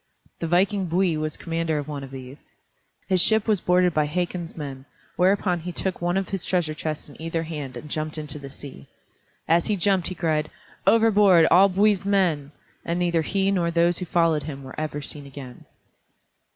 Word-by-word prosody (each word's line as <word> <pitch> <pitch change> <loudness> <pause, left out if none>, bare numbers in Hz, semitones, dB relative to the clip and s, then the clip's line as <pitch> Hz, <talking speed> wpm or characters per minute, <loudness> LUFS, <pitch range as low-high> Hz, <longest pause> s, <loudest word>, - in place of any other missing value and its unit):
The 165 - -2
viking 190 +3 +2
Bui 175 0 +1
was 155 0 -3
commander 165 -1 -2
of 145 -1 -4
one 145 -2 -5
of 135 - -8
these. 130 +1 -11 0.6
His 185 -2 +2
ship 220 +2 +3
was 210 -5 +2
boarded 180 -1 +3
by 150 -1 +1
Hakon's 175 +1 -3
men, 135 -3 -7 0.3
whereupon 185 -1 +2
he 175 +2 -6
took 185 +1 -3
one 175 +2 0
of 195 - -2
his 195 -3 -3
treasures 165 -4 0
chests 155 -1 -4
in 145 - -14
either 165 0 -2
hand 150 -6 -6
and 145 - -9
jumped 155 +1 -4
into 150 -1 -4
the 140 -1 -9
sea. 135 - -11 0.6
As 165 +1 +3
he 210 - +1
jumped 190 -1 +1
he 185 - -5
cried, 155 -3 0 0.4
"Overboard, 210 -6 +5
all 190 +3 +7
Bui's 200 +1 +2
men," 175 -8 +1 0.3
and 170 - -2
neither 170 -2 +1
he 195 +4 0
nor 175 -3 +1
those 170 0 +2
who 180 - -4
followed 165 -3 +2
him 140 -2 -7
were 130 - -9
ever 150 -1 -4
seen 145 -1 -5
again. 130 -3 -11
165 Hz, 190 wpm, -24 LUFS, 150-185 Hz, 0.6 s, all